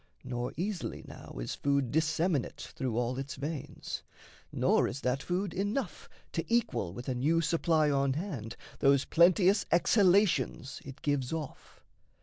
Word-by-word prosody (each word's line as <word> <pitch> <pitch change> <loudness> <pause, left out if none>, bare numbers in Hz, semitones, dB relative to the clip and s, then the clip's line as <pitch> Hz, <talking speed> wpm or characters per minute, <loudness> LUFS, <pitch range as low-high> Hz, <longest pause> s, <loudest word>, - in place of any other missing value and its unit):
Nor 120 0 -3
easily 185 +1 -3
now - - -10
is - - -3
food 140 -3 0
disseminate 160 -1 0
Through 130 -7 -2
all 125 +2 -1
its 135 0 -5
veins; 145 +1 -5 0.5
nor - - +3
is 140 - -5
that 125 +2 0
food 180 +2 -2
enough 205 +8 -3 0.2
To - - -2
equal 120 - +1
with 120 +7 -8
a 130 - 0
new 150 +7 +2
supply 165 -2 +2
on 140 -1 +2
hand 140 - -5 0.2
Those 140 -1 +4
plenteous 185 +4 +4
exhalations 175 - +3
it 135 +1 -11
gives 140 -4 0
off. 160 -4 -7
150 Hz, 140 wpm, -31 LUFS, 130-175 Hz, 0.5 s, Those